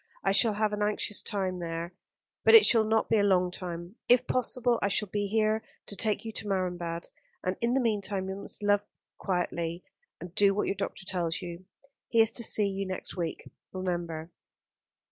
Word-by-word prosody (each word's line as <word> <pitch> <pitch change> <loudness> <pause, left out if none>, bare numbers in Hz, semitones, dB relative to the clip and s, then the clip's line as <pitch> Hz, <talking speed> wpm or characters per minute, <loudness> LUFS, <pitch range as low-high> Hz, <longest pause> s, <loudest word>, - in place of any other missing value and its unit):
I - - +3
shall 215 +2 +4
have 210 0 0
an 210 - -2
anxious 210 0 0
time 190 -3 -2
there; 170 +1 -4 0.5
but - - +8
it 450 - +10
shall 225 -2 +6
not 220 +1 +1
be 225 - +3
a - - +3
long 185 -3 +3
time. 175 +2 -6
If 245 0 +5
possible, 245 -1 +1
I - - +2
shall 200 +1 0
be 205 +1 -1
here 220 +1 +1 0.2
to 200 - -5
take 215 +1 0
you 225 - -4
to 215 - -5
Marienbad, 175 -3 -2 0.3
and 185 +1 -1
in 235 +2 +2
the - - +3
meantime 205 -5 -1
you 190 - -3
must 200 +1 -6
live 205 0 +3 0.4
quietly, 175 -2 -2 0.4
and 175 -1 -9
do 200 0 +4
what 210 - 0
your - - 0
doctor 195 -1 -5
tells 175 -1 -2
you. 175 +1 -7 0.4
He 230 - +2
is 225 0 +5
to 235 - 0
see 210 -2 +4
you 195 0 -3
next 185 - -5
week, 170 -3 -4 0.3
remember." 175 -3 -3
195 Hz, 195 wpm, -29 LUFS, 180-215 Hz, 0.5 s, it